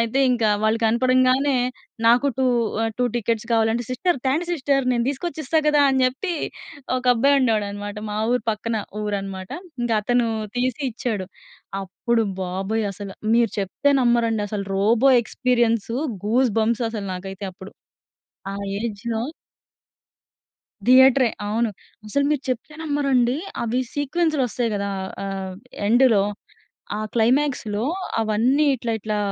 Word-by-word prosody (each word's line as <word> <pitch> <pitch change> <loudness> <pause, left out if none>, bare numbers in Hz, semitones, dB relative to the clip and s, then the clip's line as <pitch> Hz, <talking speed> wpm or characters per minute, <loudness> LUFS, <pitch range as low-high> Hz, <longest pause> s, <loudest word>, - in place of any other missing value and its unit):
అయితే 230 +3 0
ఇంకా 235 -3 +2
వాళ్ళు 220 +1 +2
కనపడంగానే 255 +4 +3 0.5
నాకు 240 +4 +5
2 265 - +2 0.4
ఆహ్, 225 - 0
2 250 - +2
టికెట్స్ 230 0 -1
కావాలంటే, 225 +1 +2
"సిస్టర్ 330 +5 0
త్యాండి, 305 +7 +1
సిస్టర్ 275 -3 +1
నేను 235 -1 +1
తీసుకొచ్చి 310 +3 -3
ఇస్తా 320 +4 +2
కదా!" 300 -1 +4
అని 265 -1 +2
చెప్పి 305 +8 -1 0.6
ఒక 255 - -3
అబ్బాయి 280 +4 +4
ఉండేడనమాట 205 -3 -1
మా 210 - -3 0.2
ఊరు 250 - +1
పక్కన 220 +1 -2 0.3
ఊరు 210 -1 -1
అనమాట. 190 -1 -7 0.3
ఇంక 240 - -1
అతను 245 +1 +2 0.3
తీసి 255 +3 -1
ఇచ్చాడు. 215 -5 -3 0.6
అప్పుడు 225 +5 0 0.2
బాబోయ్! 195 +4 -2
అసలు 195 0 -8 0.2
మీరు 235 -2 +3
చెప్తే 240 +9 +1
నమ్మరండి 230 -3 +2
అసలు 200 -2 -4
'రోబో' 235 +6 +4
ఎక్స్పీరియన్స్ 235 -3 0 0.4
గూస్‌బంప్స్ 235 0 +2
అసలు! 210 -3 -5
నాకైతే 195 +1 -6
అప్పుడు. 190 +1 -12 0.8
ఆ - - -5 0.3
ఏజ్‍లో 225 +1 -3 1.6
థియేటరే 260 -1 +6 0.2
అవును. 225 +2 +1 0.4
అసలు 280 +6 +1
మీరు 295 -3 +1
చెప్పానమ్మరండి! 275 -2 0 0.3
అవి 235 +2 0
సీక్వెన్స్‌లు 300 +1 0
వస్తాయి 235 0 -1
కదా! 200 0 -2 0.4
ఆహ్, 190 -1 -4 0.3
ఎండ్‌లో 235 -3 +5 0.8
ఆ - - -3 0.2
క్లైమాక్స్‌లో 235 -3 +1 0.4
అవన్నీ 235 +7 +2
ఇట్లా, 230 -2 -3
ఇట్లా 210 +1 -2
235 Hz, 125 wpm, -23 LUFS, 215-260 Hz, 1.6 s, థియేటరే